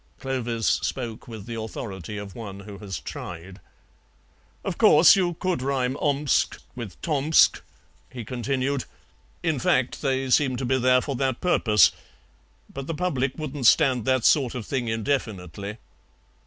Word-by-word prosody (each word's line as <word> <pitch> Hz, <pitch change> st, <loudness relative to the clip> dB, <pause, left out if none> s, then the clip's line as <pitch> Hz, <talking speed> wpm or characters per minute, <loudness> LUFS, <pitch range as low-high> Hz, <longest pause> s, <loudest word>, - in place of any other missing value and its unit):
Clovis 120 Hz, -4 st, -3 dB
spoke 120 Hz, -4 st, -2 dB
with 110 Hz, -4 st, -8 dB
the 120 Hz, -, -6 dB
authority 105 Hz, -3 st, -6 dB
of 100 Hz, -1 st, -7 dB
one 100 Hz, -4 st, -8 dB
who 100 Hz, 0 st, -10 dB
has 95 Hz, -7 st, -5 dB
tried. 90 Hz, +7 st, -8 dB, 1.1 s
"Of -, -, -3 dB
course, 160 Hz, +6 st, +7 dB
you 180 Hz, -3 st, 0 dB
could 180 Hz, -4 st, -1 dB
rhyme 130 Hz, -1 st, 0 dB
Omsk 145 Hz, -1 st, +1 dB, 0.2 s
with 115 Hz, -6 st, -8 dB
Tomsk," 155 Hz, 0 st, +3 dB, 0.5 s
he 120 Hz, -3 st, -8 dB
continued; 130 Hz, +3 st, -2 dB, 0.6 s
"in 160 Hz, -5 st, 0 dB
fact, 125 Hz, +1 st, +1 dB
they 135 Hz, -2 st, -1 dB
seem 130 Hz, -2 st, +3 dB
to 130 Hz, -, -3 dB
be 130 Hz, +1 st, +1 dB
there 125 Hz, 0 st, +4 dB
for 140 Hz, 0 st, -4 dB
that 130 Hz, -2 st, -1 dB
purpose, 110 Hz, -, +4 dB, 0.8 s
but 135 Hz, 0 st, -6 dB
the 165 Hz, -, -3 dB
public 140 Hz, -6 st, -1 dB
wouldn't 145 Hz, -5 st, -1 dB
stand 130 Hz, -7 st, +4 dB
that 130 Hz, -2 st, +1 dB
sort 135 Hz, -6 st, +3 dB
of 120 Hz, -4 st, -5 dB
thing 130 Hz, -4 st, -2 dB
indefinitely." 105 Hz, -, -3 dB
125 Hz, 145 wpm, -25 LUFS, 110-140 Hz, 1.1 s, course